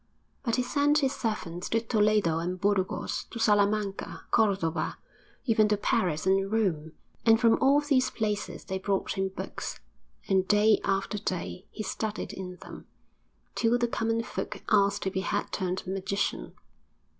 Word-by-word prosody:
But 235 -4 0
he 250 - +1
sent 285 +3 +2
his 275 -3 +2
servants 180 -8 -3
to 225 - +2
Toledo 210 -7 +2
and 180 +2 -3
Burgos, 195 -1 0
to - - -9
Salamanca, 205 -2 +1
Cordova, 180 -7 +1 0.5
even 220 -4 +4
to 210 0 +2
Paris 175 -5 0
and 195 +1 +2
Rome; 165 -8 0 0.3
and 225 -1 +5
from 230 -2 +4
all 280 +2 +5
these 265 -3 +2
places 210 -2 -3
they 190 -1 -3
brought 195 0 -1
him 190 -1 -1
books 190 - -6 0.5
and 190 -1 +2
day 210 +1 +4
after 195 +2 -1
day 185 +1 -4
he 215 - -6
studied 215 +2 -4
in 180 -1 -6
them, - - -11 0.7
till 230 +1 +2
the 240 0 +1
common 230 0 -1
folk - - -5
asked 200 -2 +3
if 190 - -1
he 190 - 0
had 200 +1 -2
turned 185 -1 -2
magician. 195 +1 -2
205 Hz, 155 wpm, -28 LUFS, 190-225 Hz, 0.7 s, and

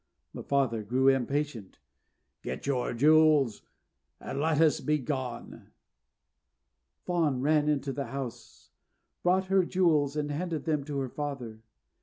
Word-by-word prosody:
The - - -7
father 130 -5 0
grew 130 +6 +2
impatient. 135 -4 -1 0.6
"Get 65 - -6
your 130 -3 -1
jewels 150 -3 +4 0.6
and 135 - -5
let 155 0 +1
us 160 -2 +4
be 150 0 +1
gone!" 130 -3 -5 1.4
Fawn 160 -8 0
ran 150 +1 +2
into 140 -2 -1
the 140 0 -4
house, 135 -4 -8 0.5
brought 185 +2 +2
her 190 0 +3
jewels, 160 -6 +1
and 150 -1 -2
handed 160 +1 -3
them 155 -3 0
to 145 -1 -4
her 130 - -3
father. 125 -6 -6
145 Hz, 130 wpm, -29 LUFS, 130-155 Hz, 1.4 s, jewels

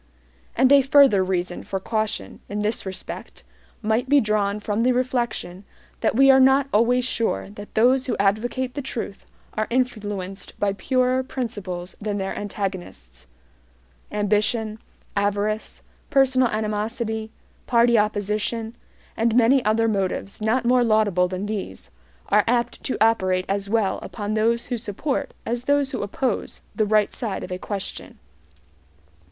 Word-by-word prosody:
And 260 +2 +4
a 280 -1 +8
further 270 -7 +5
reason 180 -1 -2
for 195 - -3
caution, 220 +1 -3
in 210 +1 -3
this 210 -1 -1
respect, 190 - -7 0.4
might 220 +4 0
be 290 0 +6
drawn 210 -3 0
from 210 +1 -1
the 250 +2 +3
reflection 240 -7 -2 0.4
that - - +1
we 270 +2 +7
are 265 - +6
not 265 +1 +5
always 245 +3 +3
sure 225 - -1
that 205 0 -11
those 255 +4 +3
who - - -1
advocate 240 +6 0
the 285 - -4
truth 230 -6 -6 0.3
are 215 0 -1
influenced 205 -6 -3
by 200 -1 +1
purer 255 +4 +1
principles 205 -9 -5
than 205 -1 -2
their 195 -1 -3
antagonists. 185 - -6 0.8
Ambition, 210 +1 0 0.4
avarice, 205 +2 -1 0.3
personal 265 -3 +4
animosity, 220 +1 -2 0.4
party 235 0 +4
opposition, 215 +2 0 0.4
and 225 0 +1
many 250 +2 +5
other 225 +1 +2
motives 195 -1 -2
not 230 +3 +1
more 250 0 +4
laudable 215 -5 +3
than 185 +2 -4
these, 195 - -5 0.4
are 210 0 +4
apt 240 0 0
to - - -1
operate 185 -5 +2
as 200 0 -2
well 220 -3 +1
upon 210 -1 -4
those 230 +2 +1
who 245 -2 -2
support 265 +6 -3
as 240 +1 -3
those 285 -1 +2
who 260 - -3
oppose 225 +6 -2
the 215 -2 +1
right 215 0 +2
side 215 -5 -4
of 185 - -8
a 180 - -3
question. 200 -1 -5
215 Hz, 145 wpm, -23 LUFS, 200-245 Hz, 0.8 s, a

